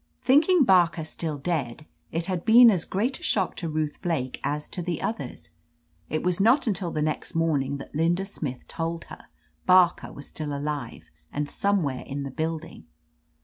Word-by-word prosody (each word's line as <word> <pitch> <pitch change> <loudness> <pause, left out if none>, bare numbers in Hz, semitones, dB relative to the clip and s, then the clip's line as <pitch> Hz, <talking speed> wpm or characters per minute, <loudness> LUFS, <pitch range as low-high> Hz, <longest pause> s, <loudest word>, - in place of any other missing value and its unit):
"Thinking 305 +5 +5
Barker 175 -6 +4
still 155 -1 -4
dead, 145 -3 -3 0.3
it 165 +1 -2
had 180 -2 -2
been 235 +1 +8
as 180 -5 0
great 235 +8 -1
a - - -15
shock 190 -4 +1
to 165 - -3
Ruth 155 -1 -2
Blake 140 -8 -2
as 150 +1 -2
to 180 - -4
the 170 -1 -2
others. 120 - -5 0.6
It 155 - -2
was 180 0 0
not 235 +8 +4
until 195 -5 -1
the 155 -2 -1
next 155 +1 -3
morning 145 -4 +1
that 135 - -10
Linda 170 +5 +1
Smith 145 -10 -6
told 165 0 -3
her - - -12 0.4
Barker 180 -1 +4
was 140 - -9
still 145 -2 -4
alive, 145 0 -5 0.2
and 145 0 -2
somewhere 160 -7 0
in 140 +1 -5
the 140 - -5
building. 160 - -4
165 Hz, 175 wpm, -26 LUFS, 145-185 Hz, 0.6 s, been